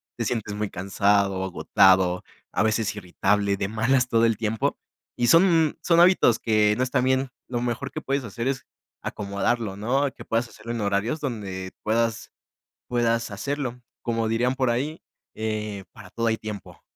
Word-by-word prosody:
Te - - -2
sientes 110 -3 -2
muy 105 -1 -2
cansado, 100 +1 +1
agotado, 95 0 +3 0.3
a 100 - +2
veces 110 -1 0
irritable, 100 +1 0
de 95 - -1
malas, 125 +4 +2
todo 115 -1 +2
el 115 -3 +2
tiempo. 110 -1 -1 0.4
Y 120 - +1
son 165 -2 +5
son 170 -1 +3
hábitos, 175 -10 +5
que 105 -1 +3
no 130 - +1
están 125 0 +1
bien. 130 +1 +1 0.2
Lo 120 - -1
mejor 125 +3 -3
que - - -4
puedes 135 0 -1
hacer, 115 +2 -4
es 135 -1 -2 0.4
acomodarlo, 100 +1 -2
¿no? 130 +6 +1
Que - - -12
puedas 115 +1 0
hacerlo 115 - -8
en 115 -2 -3
horarios, 100 +8 0
donde 95 -8 -4
puedas 115 0 0 0.6
puedas 115 -1 +1
hacerlo. 125 +3 -3 0.2
Como 115 -1 -1
dirían 120 +4 +1
por 130 -2 +1
ahí, 145 +7 -2 0.3
eh: 105 -2 -3
"Para - - -13
todo 115 0 -2
hay 110 -1 +1
tiempo". 105 -2 -8
115 Hz, 165 wpm, -25 LUFS, 105-125 Hz, 0.6 s, son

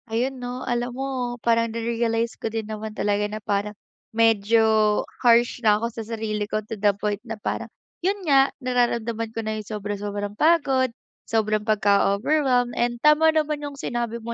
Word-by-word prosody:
Ayun 250 +3 -1
'no. 245 +1 -5
Alam 240 0 -1
mo 270 0 -2 0.4
parang 230 0 +3
na-realize 230 0 -1
ko - - -1
din 225 -1 -3
naman 215 0 -6
talaga 205 0 +1
na 215 - -5
parang 205 0 -2 0.3
medyo 225 0 +3 0.6
harsh 240 0 +4
na 210 -2 +4
ako 225 - -2
sa 225 - -5
sarili 215 -2 -3
ko, 215 - 0
to 215 - -7
the 205 0 +3
point 205 -1 -2
na 225 -2 -6
parang, - - -3 0.3
yun 390 +3 +1
nga, 275 -1 +5
nararamdaman 235 -2 0
ko 225 - -5
na 220 0 -2
'yung 210 - -9
sobra-sobrang 205 -1 -4
pagod, 275 -3 +3 0.4
sobrang 215 -1 +1
pagka-overwhelm. 230 +5 +2
And 240 0 0
tama 300 +1 +6
naman 305 -1 0
'yung 285 -1 -6
sinabi 240 -3 -3
mo 235 +1 -5
230 Hz, 165 wpm, -24 LUFS, 215-245 Hz, 0.6 s, tama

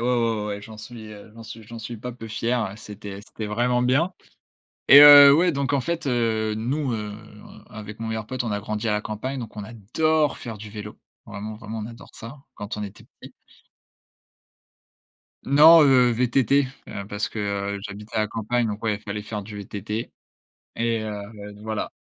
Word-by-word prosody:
ouais, 120 -1 +1
ouais, 105 - -4
ouais, 100 -1 -4
j'en 110 +1 -11
suis, 110 0 -10
heu, 105 +1 -13
j'en 115 - -10
suis 110 +1 -10
j'en 115 +2 -10
suis 115 +1 -7
pas 125 +3 -6
peu 120 -2 -10
fier 115 +3 -1
ouais, 95 +1 -7
c'était 100 -2 -9
c'était 110 -1 -7
vraiment 120 +4 +1
bien 135 +9 +2 0.8
et 140 - +11
heu, 145 -1 +11
ouais, 175 +2 +3
donc 140 -1 -2
en 140 - +2
fait, 170 +3 -3
heu, 110 -4 0
nous, 130 +5 -2
heu, 105 -2 -4 0.3
en - - -14
avec 105 0 -9
mon 115 - -5
meilleur 110 -1 -4
pote, 130 +1 -3
on 115 - -2
a 105 - -2
grandi 105 +2 -4
à - - +2
la 105 - 0
campagne 115 +6 -5
donc 110 -2 -9
on 105 - -5
adore 145 +8 0
faire 115 -3 -7
du 105 +1 -9
vélo, 105 0 -9 0.3
vraiment, 105 +1 -7
vraiment 110 0 -7
on 105 - -5
adore 115 0 -12
ça, 115 +5 -9 0.2
quand 105 +2 -6
on 105 - -4
était 100 0 -9 0.2
petit. - - -11 2.1
Non, 155 +4 +8
heu, 130 -4 +5
VTT, 125 +3 +2 0.2
heu, 100 - -6
parce 105 +1 -3
que, - - -8 0.4
heu, 100 - -6
j'habite 105 +2 -9
à 110 - +2
la 105 - 0
campagne, 115 +2 -1
donc 105 0 -4
ouais, 105 -2 0
fallait 105 0 -5
faire 105 0 -5
du 105 +1 -9
VTT. 105 +3 -5 0.6
Et 115 -1 0
heu, - - -5 0.3
heu, 105 0 -9
d 105 - -15
voilà 110 -1 -3
110 Hz, 205 wpm, -24 LUFS, 105-125 Hz, 2.1 s, et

